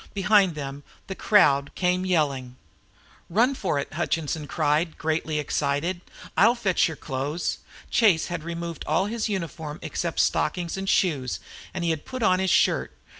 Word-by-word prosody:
Behind 195 -3 +4
them 140 -1 -6 0.2
the 190 - -5
crowd 145 -9 +3
came 180 0 +1
yelling. 140 -8 0 0.7
"Run 235 +9 +3
for 190 - -1
it!" 140 - -2
cried - - -8
Hutchinson, 160 -1 -1
greatly 155 +1 0
excited. 150 +4 -1 0.3
"I'll 230 +5 +5
fetch 200 -7 +2
your 160 -2 -6
clothes." 145 +5 -3 0.3
Chase 195 -9 +4
had 175 -3 -4
removed 170 -1 -5
all 160 +5 +2
his 225 +1 -2
uniform 160 -5 -4
except 170 -2 -3
stockings 175 -2 +1
and 195 0 -3
shoes, 140 -9 +1 0.3
and 180 - -4
he 170 - +2
had 160 -2 -3
put 255 -2 -5
on 185 -2 +4
his 190 0 +1
shirt. - - +2
170 Hz, 155 wpm, -25 LUFS, 150-190 Hz, 0.7 s, I'll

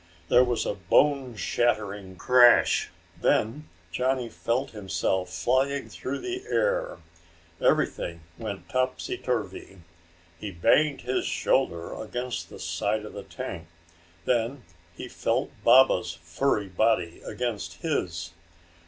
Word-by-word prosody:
There 125 - +6
was 120 -2 0
a - - 0
bone 130 - +2
shattering 105 -4 -1
crash. 125 +4 +5 0.3
Then 140 +8 +1 0.2
Johnny 125 +2 0
felt 130 +5 -2
himself 95 -3 -1
flying 135 +2 0
through 135 +2 -4
the 370 +1 -4
air. - - 0 0.6
Everything 85 - +1
went 105 -2 -6
topsy 130 0 -1
turvy. 105 -5 -4 0.6
He 105 - -5
banged 140 - +3
his 125 +2 -1
shoulder 85 0 0
against 125 +3 -4
the - - -10
side 105 +1 -2
of - - -9
the - - -6
tank. 85 0 -7 0.6
Then 120 +2 0 0.3
he - - -7
felt - - -1
Baba's 125 -6 +5
furry 100 +6 0
body 90 -3 +1
against 120 - -4
his. 85 - -2
120 Hz, 115 wpm, -27 LUFS, 95-130 Hz, 0.6 s, There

